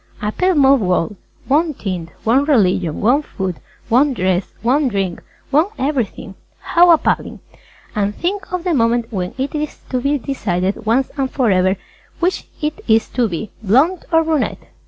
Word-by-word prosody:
A 210 0 -2
pale 370 +8 +1
mauve 275 -3 +5
World! 180 +1 0 0.3
One 305 +2 +2
tint, 180 -7 -4
one 255 +6 +3
religion, 185 - +2
one 250 +7 +3
food, 190 - -4 0.3
one 260 +4 +3
dress, 185 -2 0
one 270 +4 +2
Drink, 195 -6 -2 0.3
one 305 +6 +4
everything. 255 -8 -2 0.3
How 350 +1 +4
appalling! 330 -2 +2 0.6
And 205 0 0
think 385 +3 -3
of 365 -2 -2
the 355 -2 0
moment 230 -2 +1
when 180 -2 -3
it 270 +1 -2
is 300 -1 -3
to 255 -1 0
be 280 +3 +1
decided 205 -6 -2
once 255 +4 +2
and 270 -1 0
forever 190 -8 +2 0.4
which 360 +2 -1 0.2
it 305 +1 -2
is 220 -1 +3
to 240 -3 0
be 185 +4 -5
Blonde 270 - +2
or 325 0 +4
Brunette! 315 -2 -2
250 Hz, 160 wpm, -18 LUFS, 200-295 Hz, 0.6 s, mauve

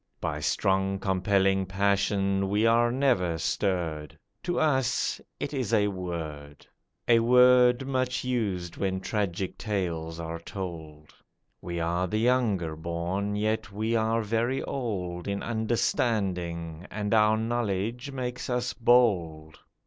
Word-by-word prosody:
By 75 -3 -3
strong 95 +5 +1
compelling 95 0 +1
passion 100 0 +1
we 105 +3 +2
are 120 +1 +4
never 120 -11 +1
stirred; 80 -5 -2 0.2
To 175 - -1
us 135 -5 +1 0.2
it - - -4
is 130 -6 -2
a 105 -1 +3
word— 80 -6 -6 0.4
A 115 -1 +6
word 125 +1 +5
much 130 -1 -1
used 100 -9 -2
when 95 -1 -1
tragic 95 -2 -3
tales 85 -6 -3
are 85 0 -5
told; 80 -5 -8 0.5
We 85 -1 -4
are 85 +2 0
the 110 - -1
younger 110 -9 +1
born, 85 +5 -3
yet 110 +1 -1
we 110 +3 -1
are 115 0 +1
very 115 +5 0
old 90 -9 -4
In 100 0 -2
understanding, 95 -7 -1
and 105 0 -2
our 110 0 +4
knowledge 115 +2 -2
makes 125 -2 -4
us 125 0 -1
bold. 90 -11 +2
100 Hz, 125 wpm, -27 LUFS, 85-115 Hz, 0.5 s, A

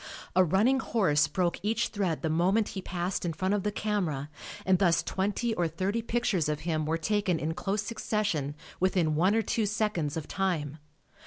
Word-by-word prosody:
A 185 - +6
running 210 - +3
horse 150 - +2
broke 175 +3 0
each 220 +3 0
thread 185 -7 -2
the 160 - +1
moment 190 +7 +2
he 190 - -5
passed 180 0 -3
in 170 -2 -1
front 185 +5 0
of 205 - +1
the 210 - -1
camera 175 -10 -2 0.3
and 185 -1 +4
thus 175 -4 +3
twenty 205 +5 -1
or 175 -5 +1
thirty 190 +8 -1
pictures 220 -9 0
of 150 0 -2
him 155 -2 -1
were 160 +1 +1
taken 195 +1 0
in 155 +1 -2
close 195 +4 -2
succession 205 -10 -1 0.2
within 180 -4 +2
one 185 +7 +3
or 225 - +2
two 220 -1 0
seconds 200 -8 -1
of 160 - -5
time. 160 -6 -2
185 Hz, 185 wpm, -29 LUFS, 160-210 Hz, 0.3 s, A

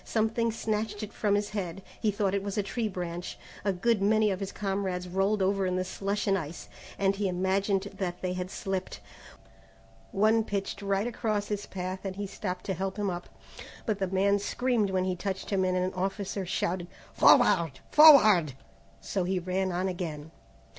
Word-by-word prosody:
Something 225 +1 0
snatched 215 -1 -2
it 210 - -7
from 205 -2 +1
his 205 0 -1
head, 195 -3 -4 0.2
he 220 - +1
thought 200 -2 0
it 200 - +1
was 200 0 -4
a 205 - +2
tree 225 +3 -2
branch. 175 -3 -5 0.3
A 200 - +2
good 210 +3 +1
many 215 +1 +3
of 190 - -2
his 195 -1 -4
comrades 195 -3 -2
rolled 195 +3 +1
over 195 0 +1
in 180 - 0
the 185 - 0
slush 195 +2 -2
and 195 -2 +3
ice, 160 +1 -8 0.3
and 195 0 +2
he 200 0 -1
imagined 190 +2 +1 0.2
that 180 -2 -2
they 180 0 -1
had 180 0 -4
slipped. 190 -1 -4 1.1
One 220 +3 +3
pitched 200 -1 -3
right 200 +1 0
across 215 -3 -2
his 205 -1 -3
path 185 0 -4
and 190 -1 -4
he 205 +1 -3
stopped 185 -2 -5
to 190 - -1
help 190 +2 -3
him 205 -2 0
up, 175 0 -6 0.6
but 210 -3 -1
the 190 - 0
man 195 +2 +2
screamed 235 0 0
when 185 -1 +1
he 185 -1 -1
touched 190 +2 -4
him 195 -2 +2
and 185 0 +1
an 185 +1 0
officer 195 0 -3
shouted, 175 0 -1 0.3
"Forward! 165 -5 +5 0.2
Forward!" 215 - +8 0.5
so 190 - -2
he 185 +1 0
ran 185 +1 -1
on 180 +2 -1
again. 160 -4 -5
195 Hz, 190 wpm, -29 LUFS, 185-205 Hz, 1.1 s, Forward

